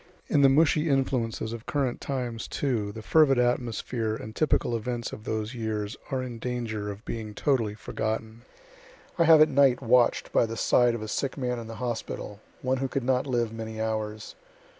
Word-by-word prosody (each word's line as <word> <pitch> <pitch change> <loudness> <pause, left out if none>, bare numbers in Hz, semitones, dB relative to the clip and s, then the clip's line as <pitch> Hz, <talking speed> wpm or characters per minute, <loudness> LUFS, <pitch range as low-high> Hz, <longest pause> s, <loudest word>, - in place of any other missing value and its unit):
In 145 - +3
the 135 - +7
mushy 155 +2 +3
influences 125 -5 0
of 115 -1 -8
current 135 -4 -1
times, 125 -4 -3
too, 115 -8 -1
the 110 +1 -9
fervid 150 -2 +4
atmosphere 120 -2 0
and 110 0 -8
typical 135 -5 +1
events 120 +1 -3
of 110 - -9
those 110 +2 -2
years 110 -3 -3
are 130 -1 -1
in 120 -2 -6
danger 115 -4 -3
of 100 +2 -8
being 110 -2 -5
totally 115 -7 +1
forgotten. 110 +1 -4 0.8
I 170 - +5
have 160 -1 +8
at 155 - +7
night 135 -3 +4
watch'd 120 -1 +3
by 115 - +3
the 115 0 -5
side 120 +1 +3
of 110 - -5
a - - -5
sick 135 +6 -2
man 125 -2 -2
in 115 - -8
the 115 - -7
hospital, 115 -4 -4 0.2
one 130 +1 +1
who 135 +1 -1
could 135 0 -2
not 130 +2 +1
live 120 -3 0
many 110 -1 -6
hours. 110 -1 -3
120 Hz, 185 wpm, -27 LUFS, 110-130 Hz, 0.8 s, have